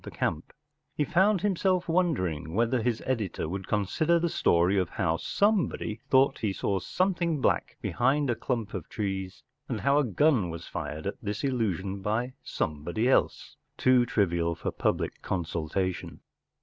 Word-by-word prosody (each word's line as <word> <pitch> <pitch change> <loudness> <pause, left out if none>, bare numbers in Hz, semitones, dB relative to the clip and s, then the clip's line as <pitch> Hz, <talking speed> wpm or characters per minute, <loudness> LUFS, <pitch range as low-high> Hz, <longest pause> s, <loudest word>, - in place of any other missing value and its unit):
75 - - -2
3 - - -23 0.4
He 150 - +1
found 190 +4 +3
himself 185 -2 +1
wondering 95 - 0
whether 120 +2 +2
his 115 -1 -1
editor 110 -11 -2
would 95 +3 -5
consider 150 - +1
the 170 0 0
story 90 - +3
of 90 -3 -1
how 85 -3 0
some¬ 205 - +2
body 110 0 -5
thought 135 +1 +4
he 105 - 0
saw 95 0 -1
something 175 - 0
black - - 0
behind 140 +4 +1
a 120 - +2
clump 115 -3 -3
of - - -6
trees, 95 -4 -4 0.3
and - - -2
how 140 +1 +3
a - - +3
gun 125 - +2
was 85 +1 -7
fired 75 +1 -5
at 100 - -4
this 105 +3 -4
illusion 100 -7 -1
by 115 +6 -1
somebody 85 +10 -2
else, 130 - +1 0.2
too 130 -1 +5
trivial 85 -7 +1
for - - -3
public - - -1
consumption. 85 +1 -3
110 Hz, 160 wpm, -28 LUFS, 95-145 Hz, 0.4 s, too